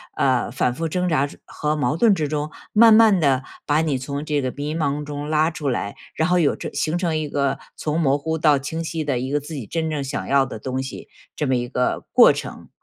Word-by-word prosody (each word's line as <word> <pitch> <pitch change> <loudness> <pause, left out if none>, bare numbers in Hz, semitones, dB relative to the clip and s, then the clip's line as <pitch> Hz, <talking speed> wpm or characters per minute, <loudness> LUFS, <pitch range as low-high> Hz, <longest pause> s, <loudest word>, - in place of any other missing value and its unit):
呃， 130 -3 +1
反 125 0 0
复 165 +6 -3
挣 180 +2 -1
扎 145 -2 +2 0.2
和 150 0 -2
矛 150 +1 0
盾 210 +1 +4
之 150 -4 -2
中， 150 0 -2 0.2
慢 225 +1 +7
慢 220 -4 +6
地 135 -4 +2 0.2
把 150 +2 +2
你 150 -4 0
从 140 +3 -5
这 150 -2 -1
个 130 - -1
迷 145 +2 -3
茫 150 -2 -1
中 145 0 -5
拉 155 +1 +2
出 155 -3 -5
来， 120 -6 -2 0.2
然 160 +2 +1
后 180 0 +3
有 155 -4 +2
这 - - -6
形 160 +2 -1
成 170 -3 0
一 155 -1 -2
个 140 -1 -1 0.2
从 155 +2 -2
模 140 -3 +2
糊 160 +2 -2
到 150 -2 +4
清 145 +4 -4
晰 160 -1 -3
的 140 -4 -1
一 130 +2 -3
个 145 +1 0
自 155 +3 -9
己 125 -6 -5
真 160 +4 -2
正 150 -2 -2
想 135 -1 -4
要 140 -1 +4
的 125 - -7
东 130 +4 -3
西， 135 - -8 0.3
这 150 - -1
么 130 -1 +2
一 120 0 -3
个 125 0 -1
过 - - +8
程。 - - -7
150 Hz, 260 characters per minute, -22 LUFS, 135-160 Hz, 0.3 s, 过